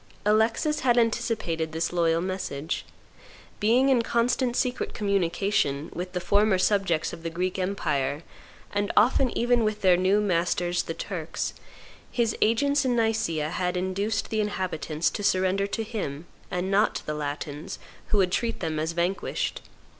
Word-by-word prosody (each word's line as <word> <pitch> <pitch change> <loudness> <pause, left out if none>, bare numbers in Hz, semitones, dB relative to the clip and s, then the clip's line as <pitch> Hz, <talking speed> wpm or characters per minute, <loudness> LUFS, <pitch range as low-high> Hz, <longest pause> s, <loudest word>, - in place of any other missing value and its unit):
Alexis 220 +8 +2
had 245 -2 +3
anticipated 220 -9 0
this 165 +2 -1
loyal 165 -1 +2
message. 175 -5 -3 0.7
Being 245 +6 +4
in 255 -3 +4
constant 240 +2 +1
secret 250 -1 -1
communication 195 -7 0
with 180 +1 -5
the 180 - -1
former 200 +2 +3
subjects 185 -4 +1
of - - -8
the 165 - -3
Greek 180 +3 -2
empire, 150 -6 -1 0.5
and 205 0 0
often 250 +4 +5
even 240 0 +3
with 215 -1 -1
their 185 -3 +5
new 190 +3 +3
masters 175 -2 +1
the 165 - -5
Turks, 170 -4 -4 0.6
his 235 -3 +1
agents 280 +6 +3
in 255 -2 +1
Nicaea 220 -10 0
had 180 0 -1
induced 200 +3 -1
the 220 -1 +1
inhabitants 180 -6 -1
to - - -4
surrender 190 0 +2
to 225 +2 -2
him, 185 -9 -4 0.2
and 180 +2 -2
not 205 +2 +3
to - - -5
the 150 - -2
Latins, 150 0 -5 0.3
who 210 - +1
would 185 -2 +3
treat 230 +4 -1
them 160 -3 -2
as 160 +2 -1
vanquished. 175 +3 -1
190 Hz, 155 wpm, -26 LUFS, 170-220 Hz, 0.7 s, often